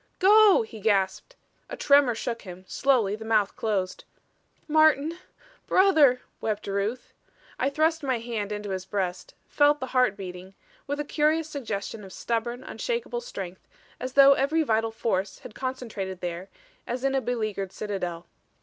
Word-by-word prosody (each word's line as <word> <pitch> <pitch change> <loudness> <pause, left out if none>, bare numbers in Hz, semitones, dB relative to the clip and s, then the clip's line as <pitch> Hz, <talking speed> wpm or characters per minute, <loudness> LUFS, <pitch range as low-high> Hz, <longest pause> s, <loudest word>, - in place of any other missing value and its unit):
"Go!" 410 - +6
he 220 0 -10
gasped. 200 - 0 0.3
A - - -6
tremor 280 -4 +4
shook 230 +1 -4
him; 185 -1 -11
slowly 240 -8 +2
the 220 - -9
mouth 215 -3 +1
closed. 195 -4 -2 0.6
"Martin! 310 +1 +3 0.5
Brother," 310 -10 +5 0.2
wept 215 -1 -2
Ruth. 200 +5 -3 0.5
I 265 - +2
thrust 315 +3 +1
my 260 -4 0
hand 225 -3 -4
into 210 -1 -4
his 185 -1 -3
breast; 185 -2 -4
felt 290 0 +3
the 260 - -3
heart 250 -6 +3
beating, 185 0 -9 0.3
with 285 +1 -3
a 295 - -2
curious 305 +2 +1
suggestion 225 -7 -5
of 190 -2 -11
stubborn, 235 +4 -3
unshakable 480 0 -3
strength, 190 - -8 0.3
as 255 0 -5
though 275 0 +8
every 295 +4 +1
vital 225 -4 +1
force 215 -3 -2
had 225 - -12
concentrated 230 -8 -5
there 175 +1 -5 0.4
as 245 +2 -3
in 275 0 +1
a 270 - +1
beleaguered 215 -6 -3
citadel. 180 -6 -4
230 Hz, 150 wpm, -26 LUFS, 200-280 Hz, 0.6 s, though